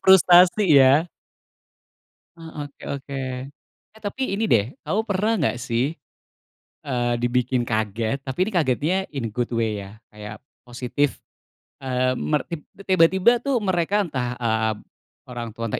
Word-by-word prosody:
Frustrasi 185 +1 +6
ya. 140 +5 +5 1.3
Ah, 160 -3 -8
oke 140 - -25
oke. 140 0 -6 0.8
Eh, 220 - -17
tapi 205 +6 -5
ini 215 - -1
deh 100 - +4 0.2
kamu 210 - 0
pernah 205 +3 +1
nggak 120 -7 +1
sih, 130 +7 0 0.9
eee, 120 -2 0
dibikin 125 +1 +1
kaget? 110 +2 -1
Tapi 130 -1 -5
ini - - -3
kagetnya 155 +2 +1 0.2
in 135 -4 -3
a - - -15
good 120 -1 -1
way 110 -2 -1
ya 100 +2 -13
kayak, 105 0 -10 0.2
positif. 125 +3 -2 0.6
Eee, 130 -1 0
mer 150 -1 0
tib 165 -3 -6 0.3
tiba-tiba 190 +6 +4
tuh 275 -1 0
mereka 190 +2 +1
entah 125 -8 -3
ap 110 -2 0 0.5
orang 120 -2 -6
tua 115 - -4
entah - - -2
135 Hz, 140 wpm, -23 LUFS, 120-175 Hz, 1.3 s, Frustrasi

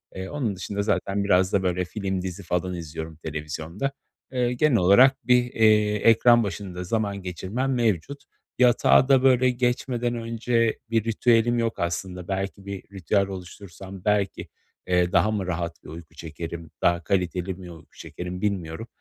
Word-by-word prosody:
Eee, 95 0 -5
onun 125 -9 -2
dışında 100 +2 -4
zaten 100 -1 0
biraz 95 -1 +2
da 95 -1 +2
böyle 90 0 0
film, 95 -1 -3
dizi 95 +1 -6
falan 90 +1 -2
izliyorum 80 -1 -6
televizyonda. 80 - -5 0.4
Eee, 125 -1 0
genel 130 -1 +3
olarak 125 +10 +5
bir, 125 0 +5
eee, 105 -1 +4
ekran 115 +2 +5
başında 95 -3 -5
zaman 100 0 -2
geçirmem 95 +9 -3
mevcut. 120 - -1 0.4
Yatağa 125 +1 +5
da 135 -1 +4
böyle 130 -1 +5
geçmeden 120 -1 -1
önce 115 0 0
bir 115 -2 +1
ritüelim 115 +1 +2
yok 115 -1 -1
aslında. 90 +1 -3
Belki 95 0 -4
bir 100 -1 -6
ritüel 100 +2 0
oluştursam 95 0 -10
belki, 105 -2 0 0.4
eee, 90 -1 +2
daha 110 - +3
mı 100 -4 -2
rahat 85 -1 -4
bir - - -12
uyku 80 0 -11
çekerim, 80 +1 -7
daha 85 -1 +2
kaliteli 90 0 -1
mi 90 -1 -10
uyku 80 - -16
çekerim, 90 +1 -7
bilmiyorum. 100 0 -3
100 Hz, 155 wpm, -25 LUFS, 90-115 Hz, 0.4 s, olarak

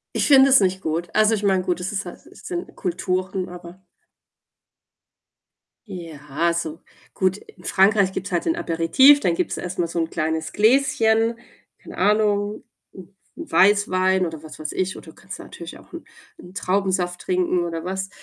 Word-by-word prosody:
Ich - - +1
finde 275 -1 +7
es 265 - +7
nicht 190 -1 0
gut. 165 +2 -2
Also, 215 +1 +4
ich 210 - -5
meine, 190 -2 +2
gut, 180 -1 -1
es 180 +1 -4
ist 200 +1 -3
halt - - -11
s - - -17
sind 350 -1 -6
Kulturen, 185 +1 -2
aber 175 +1 -11 2.1
Ja, 165 -3 -3
so. 165 -1 -4 0.3
Gut, 190 0 0
in - - -18
Frankreich 195 0 +3
gibt's 195 +1 -5
halt 175 -1 -1
den 330 - +1
Aperitif, 265 - +4
dann 175 -10 0
gibt's - - -2
erst 180 0 -6
mal 170 - +1
so 170 +1 -4
'n 165 -1 -1
kleines 160 0 -3
Gläschen, 225 -1 +2 0.4
keine - - -12
Ahnung, 210 0 +1 0.3
'n 190 0 -14 0.2
'n 330 0 -9
Weißwein 190 -2 +3
oder 160 -2 -7
was 155 -3 -11
weiß 155 -1 -5
ich 185 0 -2
oder - - -12
du - - -25
kannst 190 -2 -10
natürlich 170 0 -10
auch - - -20
'n 340 - -9 0.3
'n 180 - -14
Traubensaft 185 -2 -1
trinken 180 0 0
oder 165 -1 -4
was 190 +1 -4
185 Hz, 175 wpm, -22 LUFS, 170-205 Hz, 2.1 s, finde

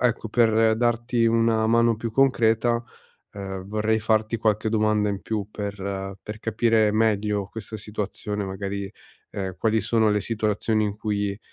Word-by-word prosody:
ecco, 115 -2 0
per 110 -1 +3
darti 120 0 +1
una 115 -1 +2
mano 115 +1 +4
più 115 +1 -4
concreta, 120 -2 +2 0.5
uhm, 95 -2 -6
vorrei 110 +1 0
farti 110 +1 +1
qualche 110 0 +1
domanda 105 -1 +2
in 100 -1 -4
più 105 -3 -3
per 100 -2 -5
per 105 0 -7
capire 115 -1 +2
meglio 105 -2 +1
questa 110 0 -7
situazione 105 0 -4
magari. 100 +1 -4 0.4
Ehm, 95 -2 -4
quali 110 +2 +2
sono 110 0 +2
le 105 0 +1
situazioni 110 -1 0
in 105 0 -3
cui, 105 -2 -2
110 Hz, 145 wpm, -24 LUFS, 100-115 Hz, 0.5 s, mano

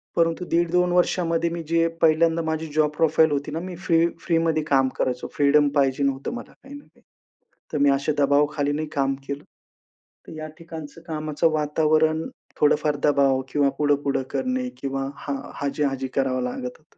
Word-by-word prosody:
परंतु 165 +1 +1
1.5-2 175 +1 +2
वर्षामध्ये 170 -2 +1
मी 170 0 -4
जे 165 0 +2
पहिल्यांदा 165 +1 +3
माझी 160 0 -2
जॉब 155 -1 +3
प्रोफाइल 160 -1 +4
होती 145 +1 -2
ना, 160 - -3
मी 180 0 -6
फ्री-फ्रीमध्ये 165 -2 +1
काम 135 -1 +3
करायचो. 125 -1 -1
फ्रीडम 145 0 +4
पाहिजे 140 -1 +2
होतं 135 - -4
मला 245 - -8
काही 275 +1 -13
ना 285 - -11
काही. - - -28 0.7
तर - - 0
मी 145 - +5
असे 140 +2 0
दबावाखाली 145 +1 +2
नाही 155 +1 -2
काम 135 -2 +1
केलं. 140 +1 -5 0.8
तर - - -10
या 155 - -5
ठिकाणचं 165 -1 -9
कामाचं 155 0 0
वातावरण 155 +1 +2 0.4
थोडंफार 150 0 +3
दबाव 140 -2 +3
किंवा 145 0 +2
पुढं-पुढं 145 -2 +1
करणे 255 -1 -1
किंवा 135 0 -2
हां, 140 -1 -4 0.3
हाजी-हाजी 140 -2 -1
करावं 130 -1 +1
लागत 125 0 -5
होतं. 155 +3 -32
150 Hz, 160 wpm, -24 LUFS, 140-165 Hz, 0.8 s, मी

